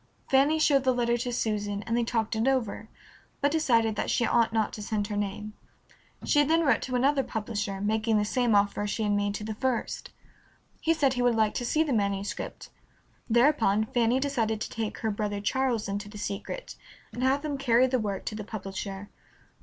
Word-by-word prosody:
Fanny 275 +4 +4
showed 285 -3 +3
the 260 -1 +2
letter 240 -1 +1
to 245 +1 -2
Susan, 205 -3 -2
and 230 - -2
they 240 - +2
talked 225 -1 -1
it 220 +3 0
over, 230 -5 -1 0.5
but 285 0 +2
decided 230 -9 +2
that - - -2
she 235 - +2
ought 230 -1 +3
not 220 -1 0
to 215 - -6
send 205 0 -1
her 210 0 -4
name. 210 +1 -3 0.7
She 290 -1 +4
then 325 +3 +3
wrote 255 -6 +3
to 255 - -3
another 270 +3 +3
publisher, 210 -4 -3
making 215 +2 +1
the 210 - +1
same 240 0 +1
offer 200 0 +2
as 205 - -2
she 220 - -2
had 210 - +1
made 205 0 0
to 210 - -5
the 220 +1 -4
first. 250 +2 -2 0.7
He 330 +1 +2
said 275 -4 +2
he 250 - -1
would 245 -1 +3
like 220 -1 +2
to 245 - -3
see 315 +4 +2
the 295 -4 -1
manuscript. 200 -2 -3 0.6
Thereupon 235 -4 +3
Fanny 240 +1 +3
decided 235 -6 0
to - - -4
take 225 -2 -3
her 220 -2 -1
brother 205 0 -2
Charles 240 0 0
into 205 +1 -4
the 210 - -10
secret 205 - -5 0.4
and 245 - -5
have 270 +3 +1
him 285 -2 -3
carry 250 -2 +4
the 255 0 +1
work 200 -3 -3
to - - -3
the 215 0 -5
publisher. 195 -1 -6
225 Hz, 205 wpm, -28 LUFS, 210-260 Hz, 0.7 s, Fanny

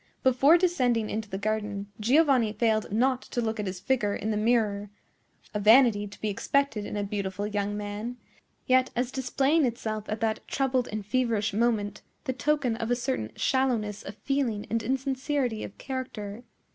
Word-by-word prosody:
Before 265 +6 +6
descending 250 - +1
into 215 -1 -3
the 190 - -3
garden, 205 -1 -2
Giovanni 255 -2 +3
failed 220 -1 +1
not 255 +4 +2
to - - -5
look 220 -2 -1
at 205 - -2
his 185 -1 -4
figure 205 -1 0
in 220 - -2
the - - 0
mirror,—a 210 -2 -2
vanity 215 -1 +5
to 205 - -13
be 215 - -2
expected 215 +1 0
in - - -4
a 205 - -1
beautiful 200 -1 -3
young 205 0 -2
man, 210 +4 -5 0.5
yet, 255 0 +4
as 245 +1 0
displaying 270 +4 +1
itself 220 -4 -2
at 215 +1 -2
that 220 -1 +1
troubled 260 -2 0
and 210 -1 -4
feverish 220 -3 0
moment, 210 -2 0 0.2
the 260 - -2
token 275 -3 +1
of 225 -1 -3
a 245 - +3
certain 240 - -2
shallowness 240 -6 0
of 195 - -8
feeling 255 -7 -1
and 230 0 +1
insincerity 265 -1 -1
of - - -8
character. 240 -4 -6
225 Hz, 170 wpm, -27 LUFS, 210-260 Hz, 0.5 s, Before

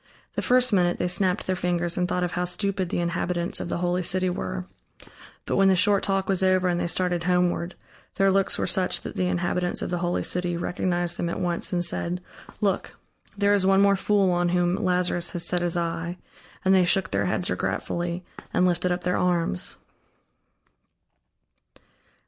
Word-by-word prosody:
The - - -2
first 250 -1 +3
minute 175 -2 +2
they 180 - -1
snapped 180 +1 +1
their 185 - 0
fingers 175 -1 -1
and 180 0 0
thought 180 0 0
of 175 - -1
how 180 - -1
stupid 190 0 -1
the - - -2
inhabitants 175 0 -1
of - - -5
the - - -2
holy 180 +1 0
city 185 +1 +2
were; 90 - -4 0.8
but - - -1
when 195 0 +5
the 190 - +4
short 200 +1 +4
talk 195 -1 0
was 190 -2 +2
over 185 -1 +3
and 175 -1 0
they - - -1
started 175 -1 -1
homeward, 180 0 0 0.4
their 195 0 +3
looks 195 0 +2
were - - -1
such 185 -1 0
that - - -8
the 180 - 0
inhabitants 180 0 -1
of - - -4
the 175 - -1
holy 175 0 -1
city 175 -1 0
recognized 175 0 -2
them 170 - -2
at - - -4
once 175 -1 -1
and 175 -1 0
said: 175 +1 -1 0.4
"Look, 195 -3 -1 0.4
there 200 0 +3
is 195 -2 +2
one 195 +1 +5
more 200 0 +4
fool 195 -1 +2
on 175 0 +1
whom 175 0 +1
Lazarus 180 -1 +1
has 175 -1 +1
set 175 +1 +1
his 175 0 0
eye," 170 +1 -3 0.5
and 190 - +5
they 190 -1 +5
shook 190 +2 +1
their 100 0 0
heads - - 0
regretfully, 175 +1 -3 0.3
and 180 - +2
lifted 180 0 +1
up 175 0 -2
their 180 0 0
arms. 170 - 0
180 Hz, 190 wpm, -25 LUFS, 175-185 Hz, 0.8 s, when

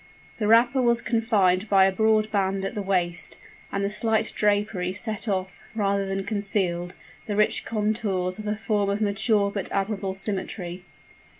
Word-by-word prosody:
The 210 - 0
wrapper 240 +4 +5
was 235 -1 +3
confined 215 -5 +1
by 195 -1 +6
a 190 - +3
broad 215 +2 +2
band 195 -1 0
at 195 - -3
the 210 - -3
waist; 175 -5 -1 0.3
and 200 - -1
the 200 - -1
slight 220 +1 0
drapery 205 -3 +1
set 215 +2 -3
off, 190 -2 -2
rather 200 -2 0
than 195 0 -2
concealed, 190 -4 -1 0.3
the 205 - -2
rich 210 +1 +2
contours 210 -4 -1
of 215 - -6
a 210 0 -1
form 205 -1 0
of 200 +1 0
mature 205 0 +1
but 200 -2 -4
admirable 195 -1 -2
symmetry. 190 -2 -4
200 Hz, 165 wpm, -25 LUFS, 190-215 Hz, 0.3 s, by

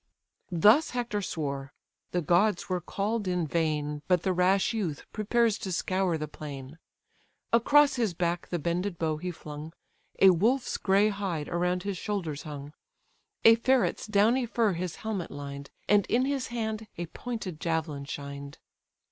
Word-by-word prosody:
Thus 210 - +5
Hector 235 -4 -1
swore: 140 -6 -4 0.4
the 175 -1 -1
gods 175 +5 +2
were 180 -1 -1
call'd 205 +4 -2
in 180 -2 0
vain, 150 -2 -1
But 180 -2 +3
the 190 - +1
rash 185 +4 +3
youth 180 -10 -3
prepares 225 +1 +2
to 190 - -4
scour 185 0 0
the 155 0 -4
plain: 145 0 -8 0.7
Across 280 +4 +5
his 220 -8 0
back 170 0 -1
the 175 - -2
bended 170 +3 -2
bow 160 -2 0
he 180 +4 -4
flung, 155 -1 -8 0.4
A 190 - +8
wolf's 235 +9 +1
grey 200 +2 +3
hide 190 -7 -3
around 180 +1 0
his 200 -3 -3
shoulders 175 -9 -3
hung, 145 -1 -8 0.7
A 225 - +10
ferret's 245 0 +1
downy 225 +4 +3
fur 225 -3 +2
his 175 0 -3
helmet 205 -6 -2
lined, 140 -1 -7 0.2
And 205 -1 +4
in 250 +2 +2
his 275 -2 -1
hand 220 -2 -3
a 175 - -3
pointed 195 -3 -6
javelin 160 -4 -2
shined. 140 0 -7
180 Hz, 155 wpm, -28 LUFS, 155-215 Hz, 0.7 s, A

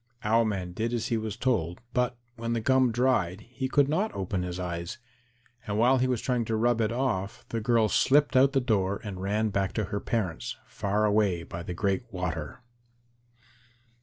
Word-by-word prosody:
Owl 115 +2 +3
man 95 -4 -2
did 115 +6 -2
as 115 - -2
he 115 - +1
was 110 -2 -4
told, 95 -10 0
but 125 -1 +1 0.2
when 115 0 -3
the 115 - 0
gum 130 +2 +3
dried 115 -6 +1
he 130 +3 -5
could 140 0 +4
not 185 +9 0
open 95 -1 -2
his 90 0 -4
eyes, 85 -1 -4 0.7
and 105 0 -1
while 125 +4 +4
he 130 - +2
was 125 -3 0
trying 125 -2 0
to 110 - -1
rub 115 +1 +2
it 110 - +1
off, 115 -6 -2
the 115 - -2
girl 115 0 +3
slipped 145 +7 +3
out 135 +1 +5
the 135 - +3
door 100 -5 +1
and 95 -4 -6
ran 105 +3 0
back 95 -2 -1
to 110 - 0
her 100 - 0
parents, 95 -9 -2
far 105 +2 0
away 100 -5 +2
by 85 +1 -7
the 85 +1 -5
Great 100 +5 -1
Water. 90 - -4
110 Hz, 190 wpm, -28 LUFS, 95-125 Hz, 0.7 s, out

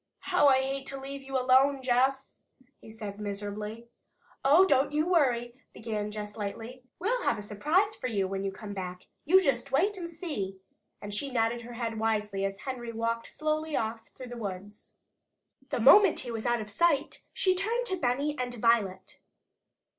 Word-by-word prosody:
"How 325 -5 +6
I 265 -1 +5
hate 270 0 -3
to 275 - -4
leave 275 +1 -7
you 270 0 -3
alone, 260 +2 +4
Jess!" 260 +2 +1 0.5
he - - -14
said 210 -2 -7
miserably. 210 +2 -5 0.6
"Oh, 305 +8 +6
don't 275 -7 +3
you 305 +1 +1
worry," 250 -9 +2 0.2
began 215 -2 -4
Jess 210 -1 -6
lightly. 225 +4 -6 0.2
"We'll 475 +8 0
have - - +1
a - - -5
surprise 305 - +1
for 255 - -4
you 200 -5 0
when 195 0 -3
you 195 - -1
come 205 +1 -8
back. 180 -2 -6 0.2
You 375 +5 +6
just 275 -2 0
wait 385 +9 +2
and 340 -2 -5
see!" 290 - -4 0.5
And 205 0 -6
she 275 +7 -1
nodded 235 -1 0
her 240 +1 -9
head 230 -2 -3
wisely 210 -3 0
as 195 0 -4
Henry 245 -3 -5
walked 230 0 -2
slowly 310 0 -2
off 225 0 -2
through 255 -1 -9
the 245 - -7
woods. 205 -1 -7 0.8
The - - -1
moment 400 -5 +7
he 245 - -5
was 225 0 -3
out 240 -1 +1
of 210 -1 -7
sight 305 +4 +1
she 370 - +2
turned 450 +6 -1
to 380 - 0
Benny 285 0 0
and 245 -1 -3
Violet. 210 -5 +1
245 Hz, 180 wpm, -29 LUFS, 210-285 Hz, 0.8 s, moment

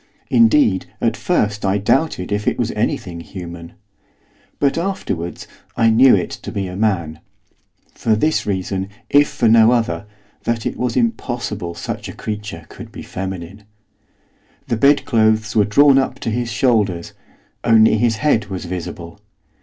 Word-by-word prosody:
Indeed 115 -4 +4
at - - 0
first 105 -1 -1
I 100 0 +1
doubted 105 - 0
if 105 0 -2
it - - +1
was 120 -1 -1
anything 105 -5 -2
human. 85 -1 -9 0.8
But, 140 -1 +1
afterwards, 165 - -3 0.3
I 115 -1 +4
knew 125 +2 +6
it 90 - -2
to - - -7
be 100 -1 -3
a 90 -1 -6
man, 90 -7 -1 0.7
for 110 - +1
this 155 +5 0
reason, 95 0 -2 0.2
if 145 0 +5
for 115 - 0
no 110 +1 +6
other, 105 -6 -1 0.3
that 115 -2 -2
it - - -2
was 125 -1 -2
impossible 120 - -2
such - - -5
a - - -7
creature 105 -6 -6
could - - -11
be - - -9
feminine. 95 +1 -6 1.1
The - - 0
bedclothes 110 -5 +2
were 105 -2 +4
drawn 135 +6 +5
up 130 -1 -2
to 115 - -2
his 120 +1 -2
shoulders; 105 -6 0 0.5
only 110 -2 +5
his 115 0 +2
head 115 -4 +1
was 95 -2 -5
visible. 85 0 -7
110 Hz, 150 wpm, -19 LUFS, 95-120 Hz, 1.1 s, knew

